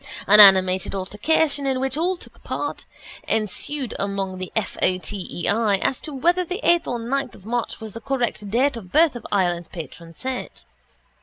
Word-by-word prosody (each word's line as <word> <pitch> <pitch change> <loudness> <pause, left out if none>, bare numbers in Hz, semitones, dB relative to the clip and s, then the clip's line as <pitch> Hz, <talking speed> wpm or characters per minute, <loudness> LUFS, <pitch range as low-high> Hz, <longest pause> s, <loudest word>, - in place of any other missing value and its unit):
An 210 +1 +6
animated 190 -2 +6
altercation 280 +10 0
(in 265 -1 0
which 265 0 -1
all 355 +4 0
took - - -13
part) - - -4 0.4
ensued 225 +5 -1
among 195 -2 -3
the 185 - -6
F. 220 - -1
O. 185 0 +3
T. 190 +1 -6
E. 175 - -4
I. 210 -1 +2
as 255 - -1
to 305 - -6
whether 345 +7 +2
the 360 +3 -5
eighth 345 0 +3
or 245 - -1
the 230 - -7
ninth 275 0 -2
of 190 - -17
March 240 +1 -2
was 220 -2 -7
the 230 - -8
correct 240 -5 -2
date 260 +6 +2
of 230 -5 -8
the - - 0
birth 320 -4 +5
of 240 - -7
Ireland's 175 -4 0
patron 165 0 -9
saint. 260 +5 -5
225 Hz, 200 wpm, -23 LUFS, 195-275 Hz, 0.4 s, An